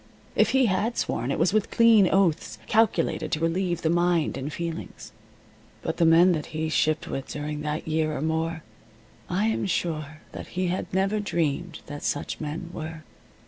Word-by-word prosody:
If - - +4
he 265 -1 +4
had 220 +3 0
sworn, 130 - -1
it - - -1
was 170 +5 +2
with 215 0 +1
clean 225 -5 +5
oaths, 190 -5 +1
calculated 215 -7 +1
to 155 - +1
relieve 175 +1 0
the 160 - +2
mind 175 -2 +2
and 135 +3 -4
feelings. 170 +1 -6 0.7
But 160 - -2
the 165 - +4
men 170 +3 +6
that 155 -4 -2
he 160 0 -1
shipped 155 0 +1
with 135 - -4
during 150 0 -4
that 150 +1 -3
year 155 -1 0
or - - -4
more 160 0 -1 0.7
I 185 +4 +1
am 220 -2 0
sure 155 -4 -2
that - - -8
he 185 -1 +1
had 185 - -3
never 195 +3 +1
dreamed 170 -3 -2
that 145 0 -7
such 145 - -2
men 155 +3 -5
were. 160 0 -6
165 Hz, 180 wpm, -26 LUFS, 155-185 Hz, 0.7 s, men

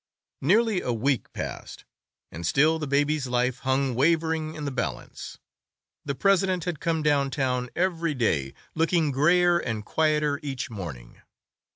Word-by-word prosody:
Nearly 210 - +3
a 125 - -2
week 125 +2 0
passed, - - -7 0.5
and 85 - -7
still 155 - +3
the 150 - -3
baby's 145 0 +1
life 125 +1 0
hung 130 0 0
wavering 160 +3 +1
in 150 - -5
the 140 - -2
balance; 125 -3 -5 0.7
the 140 -1 -3
president 190 +2 +2
had 175 -4 -3
come 165 -2 -1
down 145 -2 +2
town 125 -2 -1
every 170 -3 0
day, 75 - 0 0.2
looking 165 -2 +1
grayer 175 +5 +4
and 110 -7 -4
quieter 150 -1 +1
each 135 -3 -5
morning. 80 - -8
145 Hz, 145 wpm, -26 LUFS, 130-165 Hz, 0.7 s, grayer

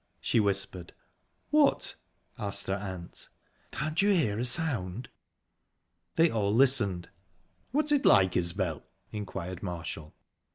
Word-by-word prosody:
she - - +1
whispered. 100 -4 -2 0.6
"What?" - - +3 0.4
asked 100 -2 -3
her 95 - -1
aunt. 95 -4 -7 0.4
"Can't 155 +6 -1
you 205 - +3
hear 140 - +2
a 120 - 0
sound?" 120 - 0 1.1
They 165 0 +4
all 105 -3 0
listened. 115 -9 +3 0.6
"What's 295 +4 0
it 290 -2 +3
like, 95 -3 +5
Isbel?" 85 -2 0 0.3
inquired 95 -4 -5
Marshall. 80 -4 -6
100 Hz, 115 wpm, -29 LUFS, 90-135 Hz, 1.1 s, like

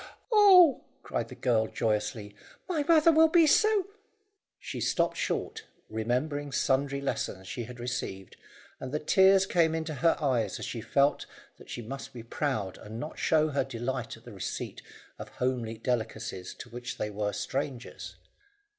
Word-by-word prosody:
"Oh!" 380 - +7 0.2
cried - - -3
the - - -10
girl 115 -3 +1
joyously, 105 -1 -2 0.3
"my 335 -5 0
mother 320 +2 +5
will 320 0 +6
be 330 0 +5
so 425 +4 +4 0.4
" - - -47 0.3
She - - -6
stopped - - +1
short, 445 +1 -3 0.3
remembering 130 +6 -1
sundry 140 0 +1
lessons 95 -8 -3
she 120 +4 -5
had 125 +1 -10
received, 95 -6 -5 0.4
and 130 - -6
the 150 - 0
tears 190 +4 +5
came 165 -4 +2
up - - 0
into 160 -1 -4
her 160 +4 +2
eyes 120 -9 0
as - - -5
she 115 - -5
felt 140 +5 +1 0.3
that - - -16
she 120 - -5
must 135 +5 -7
be 120 -2 -8
proud 115 - -2
and 110 +2 -8
not 150 +5 -6
show 155 -1 +3
her 140 -2 0
delight 120 -2 -4
at 115 - -20
the 120 - -10
receipt 95 - -5 0.4
of - - -7
homely 125 -3 -2
delicacies 110 -5 -3
to 120 - -10
which 120 +1 -6
they 105 - -3
were 105 0 -2
strangers. 130 +1 -4
130 Hz, 165 wpm, -29 LUFS, 115-160 Hz, 0.4 s, Oh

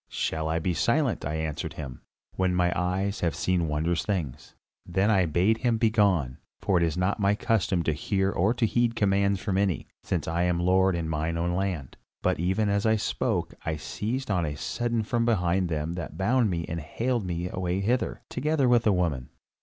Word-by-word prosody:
'Shall 80 0 -2
I 80 - +1
be 85 +2 0
silent,' 125 - +1
I 75 +2 -2
answered 80 -2 -3
him, 65 -5 -7 0.3
'when 95 -1 +1
mine 90 -1 +2
eyes 95 +3 -1
have 85 -4 0
seen 90 -3 0
wondrous 80 +3 0
things?' 85 - -4 0.3
Then 95 +4 +1
I 95 -4 +3
bade 95 +8 +2
him 120 -3 +1
begone, 100 - +2 0.2
for 95 - +1
it 85 - +3
is 80 0 0
not 90 +4 0
my 100 0 +3
custom 95 -5 +1
to 80 - +1
hear 95 +5 0
or 95 +5 +2
to 120 - +2
heed 120 +1 +1
commands 100 -2 +2
from 95 0 -1
any, 95 -5 0 0.2
since - - -2
I 85 +1 0
am 90 -1 +1
lord 95 +1 +3
in 85 -2 -2
mine 80 +1 -1
own 85 +1 0
land. 90 -7 -3 0.3
But - - +1
even 95 +5 +1
as 100 +1 +1
I 110 - +4
spoke 105 - -1
I 80 - -1
was 75 -1 -7
seized 125 +3 -3
on 90 -4 +1
a 75 -2 -3
sudden 120 +5 -1
from 115 +2 0
behind 95 -5 +1
by 85 - -2
them 75 +2 -2
that 85 -2 -6
bound 115 +4 +2
me 85 -2 -2
and 85 - -4
haled 115 - -1
me 90 -1 -3
away 90 0 -2
hither, 120 +6 -1
together 145 0 0
with 120 -1 +5
the 105 - +4
woman. 80 -9 -1
95 Hz, 210 wpm, -27 LUFS, 85-105 Hz, 0.3 s, with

